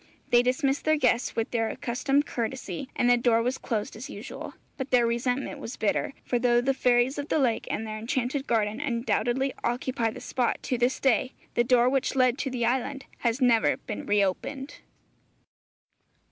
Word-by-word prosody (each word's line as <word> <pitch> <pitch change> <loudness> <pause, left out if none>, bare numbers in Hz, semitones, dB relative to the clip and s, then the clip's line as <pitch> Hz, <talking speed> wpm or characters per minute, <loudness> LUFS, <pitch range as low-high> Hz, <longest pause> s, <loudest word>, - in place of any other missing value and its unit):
They 240 - +7
dismissed 270 +3 0
their 310 0 +4
guests 250 -3 +1
with 225 -1 -1
their 225 -2 0
accustomed 275 +4 0
courtesy, 235 -3 -4
and 245 - +2
the 245 0 +5
door 235 -1 +3
was 250 +2 -1
closed 215 -4 -3
as 250 +7 -8
usual. - - -8 0.2
But 265 -1 -5
their 245 -2 +4
resentment 250 +4 -1
was 250 - -7
bitter; 220 +5 0
for 245 - 0
though 240 0 +3
the 265 +3 +1
fairies 250 +1 +2
of 285 - -5
the - - +2
lake 250 -6 +1
and 225 - -2
their 215 0 -5
enchanted 255 +4 -2
garden 220 +1 0
undoubtedly 255 0 0
occupy 240 -1 0
the - - -8
spot 250 -3 -1
to 250 - -1
this 245 +2 +1
day, 255 -1 +2 0.2
the 240 - +3
door 245 0 +4
which 270 +1 +1
led 255 -1 +3
to 270 - -1
the 245 -2 -1
island 265 +3 -1
has 235 +2 0
never 235 -3 +4
been 210 - -7
reopened. 210 +8 -1
245 Hz, 180 wpm, -27 LUFS, 235-265 Hz, 0.2 s, They